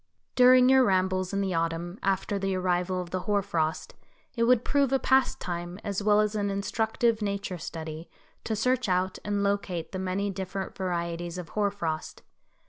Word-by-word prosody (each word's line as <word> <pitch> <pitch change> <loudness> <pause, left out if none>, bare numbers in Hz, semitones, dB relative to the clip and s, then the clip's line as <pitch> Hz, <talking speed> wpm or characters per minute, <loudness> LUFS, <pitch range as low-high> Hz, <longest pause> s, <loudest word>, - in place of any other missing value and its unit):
During 255 0 +7
your 265 0 +6
rambles 185 -3 +1
in 200 0 0
the 190 -2 -1
autumn, 165 +3 -2
after 195 +1 0
the 195 -1 -1
arrival 180 0 0
of 175 -1 -6
the 185 - -1
hoar 200 +2 0
frost, 160 -3 -2 0.4
it 230 -1 +2
would 245 0 +3
prove 280 -2 +2
a 270 - +4
pastime 180 -10 0
as 200 0 -2
well 210 0 +4
as 210 0 0
an 205 -1 -1
instructive 220 +3 0
nature 200 -3 -3
study, 160 0 -7 0.4
to 220 - -1
search 250 +1 +1
out 185 +1 0
and 205 -1 -1
locate 200 -4 -1
the 190 - -4
many 190 +2 -1
different 190 0 -5
varieties 170 -2 -3
of 180 -2 -7
hoar 205 -1 +1
frost. 165 -6 -4
195 Hz, 175 wpm, -28 LUFS, 180-210 Hz, 0.4 s, During